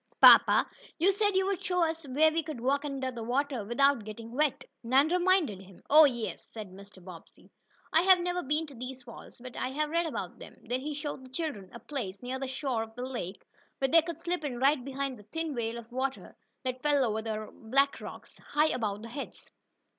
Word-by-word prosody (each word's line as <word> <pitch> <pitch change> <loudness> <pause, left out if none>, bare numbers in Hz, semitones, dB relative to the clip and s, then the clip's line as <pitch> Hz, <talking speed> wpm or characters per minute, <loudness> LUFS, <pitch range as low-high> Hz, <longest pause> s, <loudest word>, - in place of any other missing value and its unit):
"Papa, - - +8 0.3
you 360 +5 +4
said 410 0 +1
you 380 0 +3
would 390 -2 -2
show 360 -1 +1
us 325 -2 -2
where 305 +4 +4
we 330 +1 +1
could 310 -5 -7
walk 275 +4 +1
under 270 -2 -3
the 240 -2 -7
water 255 +1 -1
without 240 +3 +2
getting 225 +2 -8
wet," 290 +2 0 0.2
Nan 265 +6 +3
reminded 350 - +2
him. 190 -1 -16
"Oh, 310 +1 +10
yes," 240 -5 -2
said 215 -4 -9
Mr. 195 -1 -14
Bobbsey. 180 -3 -13 0.4
"I 320 - +6
have 375 +1 +7
never 355 0 -1
been 300 +3 0
to 290 - -12
these 255 +1 -7
falls, 240 0 -12
but 250 0 -10
I 255 - -2
have 300 +3 -2
read 335 0 +1
about - - -5
them." - - -12
Then 245 +2 -2
he 300 +1 -4
showed 290 -2 -5
the 260 - -13
children 260 - -4
a 235 - -9
place, 235 -9 -6
near 255 +1 -3
the 270 - -3
shore 260 -3 -2
of 225 0 -7
the 245 +1 -4
lake, 235 -8 -6 0.3
where 270 - +1
they 330 +4 +7
could 335 +1 -6
slip 350 -2 -2
in 265 -5 -3
right 270 +1 +3
behind 275 -2 -4
the - - -14
thin 325 -2 -2
veil 235 -2 -2
of 235 0 -10
water 265 +2 -3 0.3
that 255 -1 -3
fell 290 -3 +3
over 220 -1 -1
the 215 -1 -4
black 275 +5 +1
rocks, - - -10
high 300 +2 +1
above 210 -3 -2
their 230 - -8
heads. 280 +2 -8
265 Hz, 220 wpm, -30 LUFS, 235-305 Hz, 0.4 s, Oh